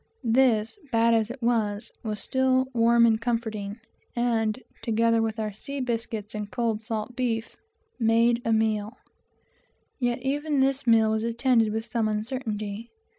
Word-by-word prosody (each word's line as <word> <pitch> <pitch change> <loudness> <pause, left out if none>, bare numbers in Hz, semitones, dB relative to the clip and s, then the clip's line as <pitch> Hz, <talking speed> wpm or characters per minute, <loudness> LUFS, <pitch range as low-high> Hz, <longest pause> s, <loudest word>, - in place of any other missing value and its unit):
This, 230 - +2
bad 230 0 +4
as 220 -1 +2
it 245 0 -8
was, 225 -2 0
was 215 -2 -4
still 260 +3 +2
warm 235 0 +5
and 220 -1 +3
comforting, 220 -3 -3 0.4
and, 230 -2 0 0.2
together 230 0 +2
with 225 0 -1
our 215 -1 -2
sea 280 +7 -6
biscuit 230 -3 -3
and 210 -1 -4
cold 225 -2 -1
salt 225 +1 -4
beef, 230 -3 -2 0.4
made 230 +1 +3
quite 230 - -3
a 220 - +4
meal. 220 +1 -1 1.0
Yet 245 -1 -1
even 290 +2 0
this 270 -1 +1
meal 225 -1 +5
was 220 0 0
attended 235 -1 +2
with 220 +1 -3
some 230 -2 -1
uncertainty. 215 -1 -3
230 Hz, 150 wpm, -26 LUFS, 220-245 Hz, 1.0 s, warm